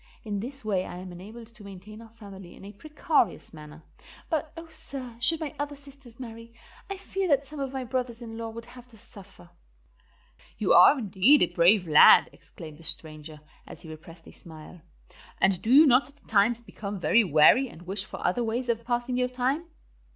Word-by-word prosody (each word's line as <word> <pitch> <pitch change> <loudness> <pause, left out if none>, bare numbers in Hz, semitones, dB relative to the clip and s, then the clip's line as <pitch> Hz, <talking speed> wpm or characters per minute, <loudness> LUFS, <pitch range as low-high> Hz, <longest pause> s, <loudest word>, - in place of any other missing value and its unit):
In 205 -3 -4
this 260 +3 -7
way 195 -4 0
I - - -8
am 185 0 -9
enabled 210 +7 -11
to 220 - -16
maintain 200 +3 -12
our 230 - -14
family 200 -5 -13
in - - -14
a 200 - -9
precarious 295 - -1
manner; 155 0 -13 0.5
but, 315 -1 -2
oh, 330 0 -9
sir, 255 -6 -8
should 325 +6 +1
my 310 -4 -5
other 290 0 -4
sisters 275 -4 -17
marry, 230 -1 -10 0.3
I 395 - -5
fear 390 0 -4
that 280 -3 +1
some 300 +1 -10
of 270 -1 -4
my 265 -1 -5
brothers 245 -2 -3
in 230 -2 -9
law 230 0 -6
would 230 +1 -10
have 250 0 -15
to 235 -3 -19
suffer." 200 - -16 1.1
"You - - +1
are 290 - +7
indeed 220 +5 +3
a 175 - -2
brave 180 +2 +3
lad," 150 -1 +7
exclaimed 155 -1 -13
the - - -15
stranger, 155 -2 -3 0.3
as - - -12
he 160 - -12
repressed 165 +1 -13
a - - -12
smile. 160 +1 -14 0.6
"And 190 -2 +1
do 225 - -2
you 295 +4 +8
not 265 0 +3
at 290 +1 -25
times 220 +3 +2
become 205 -3 -8
very 225 +5 +3
weary 180 - +4
and 170 - -14
wish 195 +2 -4
for - - -8
other 240 +7 0
ways 240 +2 -3
of 230 0 -1
passing 240 +1 -2
your 250 0 0
time?" 260 +6 -2
230 Hz, 200 wpm, -26 LUFS, 185-260 Hz, 1.1 s, you